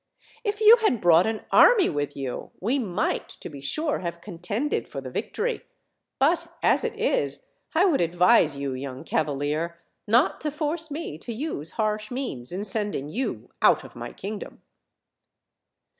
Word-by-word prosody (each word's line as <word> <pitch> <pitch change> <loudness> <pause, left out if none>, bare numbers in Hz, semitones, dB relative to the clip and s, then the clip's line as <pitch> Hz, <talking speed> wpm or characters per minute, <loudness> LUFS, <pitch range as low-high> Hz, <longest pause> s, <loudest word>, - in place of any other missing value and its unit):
If 420 -1 -2
you 440 +2 +9
had 430 - +1
brought 175 +1 +5
an 220 -1 -2
army 460 -6 +7
with 145 -1 -3
you, 135 -3 -5
we 245 +9 0
might, 205 -4 -1
to - - -7
be 140 -3 -10
sure, 300 - 0
have 170 -1 -5
contended 200 - -3
for - - -6
the - - -8
victory; 480 +2 -2 0.6
but 335 +4 +2 0.2
as - - +3
it - - -2
is, - - -1 0.3
1 360 +3 +4
would 275 - +2
advise 170 -3 +4
you, 140 -1 -3
young 130 0 -6
cavalier, 150 +3 -1 0.3
not 235 +6 +3
to 305 - +1
force 310 +2 -3
me 290 - -5
to 235 - -7
use 225 - -4
harsh 215 -1 -1
means 245 - -4
in 190 +3 -3
sending 205 -9 -2
you 250 +11 -4
out - - +5
of - - -13
my - - -6
kingdom." 205 +1 -7
210 Hz, 160 wpm, -25 LUFS, -, 0.6 s, you